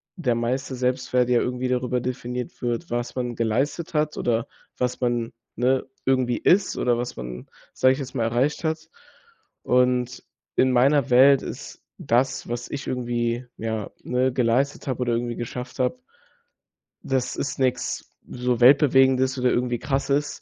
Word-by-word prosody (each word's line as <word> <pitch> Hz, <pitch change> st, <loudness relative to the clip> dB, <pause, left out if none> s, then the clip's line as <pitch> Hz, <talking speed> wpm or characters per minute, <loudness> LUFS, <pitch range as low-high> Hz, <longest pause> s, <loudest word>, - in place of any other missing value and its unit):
der 130 Hz, -, 0 dB
meiste 130 Hz, +3 st, -2 dB
Selbstwert 125 Hz, 0 st, 0 dB
ja 120 Hz, -1 st, +4 dB
irgendwie 125 Hz, 0 st, -2 dB
darüber 125 Hz, 0 st, 0 dB
definiert 125 Hz, 0 st, -5 dB
wird, 120 Hz, +7 st, -2 dB
was 120 Hz, 0 st, -2 dB
man 125 Hz, -2 st, -3 dB
geleistet 135 Hz, +10 st, -1 dB
hat 150 Hz, -1 st, 0 dB
oder 115 Hz, +1 st, 0 dB, 0.3 s
was 125 Hz, 0 st, -2 dB
man, 120 Hz, -1 st, -1 dB, 0.2 s
ne, 130 Hz, +2 st, +1 dB, 0.2 s
irgendwie 130 Hz, -2 st, +2 dB
ist, 190 Hz, +2 st, +3 dB
oder 120 Hz, -1 st, +2 dB
was 120 Hz, +1 st, -4 dB
man, 60 Hz, 0 st, -7 dB, 0.3 s
sage 130 Hz, 0 st, +4 dB
ich 130 Hz, -, -5 dB
jetzt 135 Hz, -2 st, -7 dB
mal, 120 Hz, -, 0 dB
erreicht 125 Hz, +8 st, 0 dB
hat. 160 Hz, 0 st, -2 dB, 0.7 s
Und 125 Hz, 0 st, +1 dB, 0.3 s
in 130 Hz, -, +3 dB
meiner 135 Hz, +2 st, +3 dB
Welt 130 Hz, +2 st, +6 dB
ist -, -, -8 dB
das, 125 Hz, +2 st, 0 dB
was 120 Hz, 0 st, -4 dB
ich 140 Hz, -1 st, -5 dB
irgendwie, 120 Hz, -1 st, -1 dB
ja, 110 Hz, -2 st, -3 dB
ne, 125 Hz, +1 st, +1 dB
geleistet 125 Hz, +4 st, +1 dB
habe 130 Hz, -2 st, -2 dB
oder 120 Hz, -1 st, +1 dB
irgendwie 120 Hz, 0 st, -2 dB
geschafft 125 Hz, +2 st, -6 dB
habe 130 Hz, -, 0 dB, 1.0 s
das 130 Hz, -2 st, -1 dB
ist 140 Hz, -, -3 dB
nix 130 Hz, -2 st, -1 dB, 0.2 s
so 125 Hz, -1 st, -1 dB
weltbewegendes 130 Hz, 0 st, +5 dB
oder 125 Hz, 0 st, +2 dB
irgendwie 120 Hz, -1 st, 0 dB
Krasses. 140 Hz, +2 st, -1 dB
125 Hz, 155 wpm, -24 LUFS, 120-130 Hz, 1.0 s, Welt